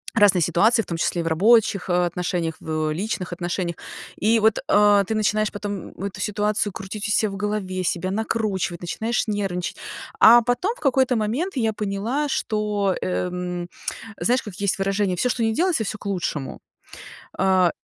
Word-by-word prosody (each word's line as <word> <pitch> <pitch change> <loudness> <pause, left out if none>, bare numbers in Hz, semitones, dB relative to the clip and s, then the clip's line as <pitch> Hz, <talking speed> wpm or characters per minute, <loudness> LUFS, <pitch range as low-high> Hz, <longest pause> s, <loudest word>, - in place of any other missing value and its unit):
разные 205 -5 +5
ситуации 210 +8 +3
в - - -9
том 170 - -3
числе 170 +1 0
и - - -4
в - - -3
рабочих 205 +4 +3
отношениях, 175 -1 0
в 155 -1 -2
личных 185 +1 -3
отношениях. 175 0 -3 0.4
И 225 +2 +2
вот, 220 0 +3
а, 205 -1 +5
ты 195 - -3
начинаешь 215 0 +1
потом 205 -2 -5
эту 200 -1 -5
ситуацию 210 0 0
крутить 200 +3 -5
у - - -1
ся 215 0 +2
в 195 - -6
голове, 200 -3 -2
себя 180 +1 -1
накручивать, 200 -4 -2
начинаешь 220 +7 -1
нервничать, 195 -4 -2 0.4
а 235 +2 +9
потом 245 - 0
в - - -18
какой-то 265 -2 +2
момент 240 - -1
я 225 -4 +1
поняла, 210 +8 -2
что, 210 -5 0
эм, 180 -1 -3 0.5
знаешь, 250 +2 +2
как 205 -4 -9
есть 200 0 0
выражение: 195 -1 0
"Всё, 250 +8 0
что 240 -1 0
ни 225 - +2
делается 335 -3 +1
всё 215 - -4
к - - -14
лучшему". 175 -7 -3 0.8
А 185 -2 +3
205 Hz, 170 wpm, -23 LUFS, 180-220 Hz, 0.8 s, а